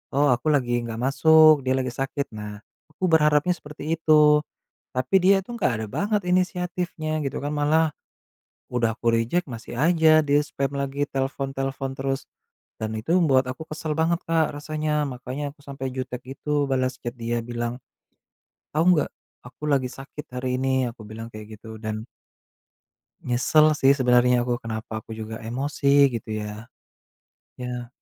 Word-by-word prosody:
oh, 145 +1 +4
aku 120 - -6
lagi 120 -4 +1
nggak 115 -1 -5
masuk, 155 +1 +6
"Dia 130 - 0
lagi 130 -1 -2
sakit," 135 +3 -3
nah 105 -1 -7 0.3
aku 155 +4 -11
berharapnya 150 +2 +4
seperti 150 +1 -4
itu. 150 -1 +5 0.5
Tapi 130 +8 0
dia 195 +1 +6
itu 195 - -21
nggak 180 - +1
ada - - -3
banget 205 - 0
inisiatifnya 180 -3 -1
gitu 135 - -3
kan, 145 - -2
malah, 155 +2 +2 0.8
udah 115 -2 +1
aku 115 -1 +1
reject, 120 +11 0
masih 120 0 -7
aja 160 -1 +5
dia 145 0 +3
spam 140 -2 -3
lagi, 140 +1 -1
telepon-telepon 135 0 -3
terus, 135 0 -2 0.5
dan 110 0 -3
itu 145 +11 0
membuat 135 -7 +4
aku 160 +5 -7
kesel 155 0 -4
banget 165 +1 +1
Kak 165 -2 +2
rasanya. 150 0 -1
Makanya 130 +3 -5
aku - - -26
sampai 135 -1 -5
jutek 130 -1 -4 0.2
gitu 150 -1 0
balas 130 -1 0
chat 120 - -4
dia, 120 0 -2
bilang, 120 +1 -4 1.0
"Tahu 155 - +3 0.2
nggak? - - -3 0.4
Aku 130 - -21
lagi 130 -2 +2
sakit 135 +3 -9
hari 125 0 -1
ini." 130 -1 +1
Aku 115 -1 -15
bilang 115 +1 -7
kayak 110 0 -9
gitu 110 -1 -10
dan 110 0 -4 1.2
nyesel 150 +5 +4
sih 140 -2 +4
sebenernya 125 -1 +4
aku, 120 0 -1
kenapa 110 -1 -5
aku - - -38
juga 110 0 -6
emosi 140 +3 +2
gitu 115 -1 -5
ya? 105 +2 -7 0.9
Iya, 125 -1 -5
135 Hz, 155 wpm, -24 LUFS, 120-155 Hz, 1.2 s, masuk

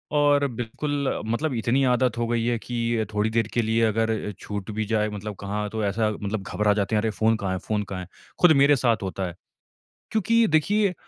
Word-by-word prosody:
और 145 -1 +4
बिल्कुल 135 +4 -3
मतलब 125 +7 -1
इतनी 120 +4 +1
आदत 125 0 +1
हो 120 0 0
गयी 115 -1 0
है 120 -1 +1
कि 115 -1 -1
थोड़ी 105 +1 +1
देर 115 -1 +1
के 120 - +2
लिए 115 +1 +1
अगर 110 -1 0
छूट 105 0 -5
भी 110 +1 -2
जाए 105 0 0
मतलब 105 0 -6
कहाँ 105 +1 -3
तो 110 +1 -3
ऐसा 105 +2 +1
मतलब 105 -1 -4
घबरा 105 +1 +1
जाते 105 +1 0
हैं 105 - +3
अरे 110 - 0
फ़ोन 110 +1 +2
कहाँ 100 -3 -3
है 95 - -1
फ़ोन 105 -1 0
कहाँ 95 -2 -6
है? 90 - -9 0.3
खुद 180 - +7
मेरे 140 +1 +5
साथ 120 -5 +1
होता 95 0 -3
है। 85 - -8 0.8
क्योंकि 230 +2 +3
देखिए 190 +5 +2
110 Hz, 210 wpm, -25 LUFS, 105-130 Hz, 0.8 s, खुद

